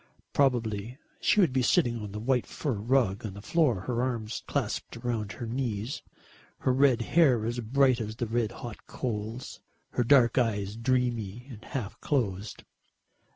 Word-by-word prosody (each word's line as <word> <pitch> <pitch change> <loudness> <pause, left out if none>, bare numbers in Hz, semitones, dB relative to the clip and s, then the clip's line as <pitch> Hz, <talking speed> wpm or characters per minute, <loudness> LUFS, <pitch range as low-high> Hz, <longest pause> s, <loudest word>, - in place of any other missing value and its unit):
Probably 120 -4 +1 0.2
she 210 - +4
would 165 -9 +3
be 130 - +2
sitting 120 - +2
on 105 -1 -6
that 105 - -5
white 125 +1 +1
fur 145 - -3
rug 110 -2 +1
on 100 -3 -5
the 100 - -8
floor, 140 - +2
her 120 +4 -1
arms 120 -3 -2
clasped - - -2
round 115 -4 -3
her 120 - -6
knees, 115 -1 -3 0.6
her 130 - +2
red 130 -3 +4
hair 130 -7 +4
as 120 +1 -2
bright 130 +1 +3
as 110 0 -4
the 120 - -2
red 115 -1 0
hot 120 -5 -9
coals, 115 0 -4 0.3
her 125 - +1
dark 125 -1 +5
eyes 105 -4 0
dreamy 120 -2 -1
and 110 -1 -10
half 125 -8 -5
closed. 105 -8 -1
120 Hz, 160 wpm, -29 LUFS, 110-130 Hz, 0.6 s, dark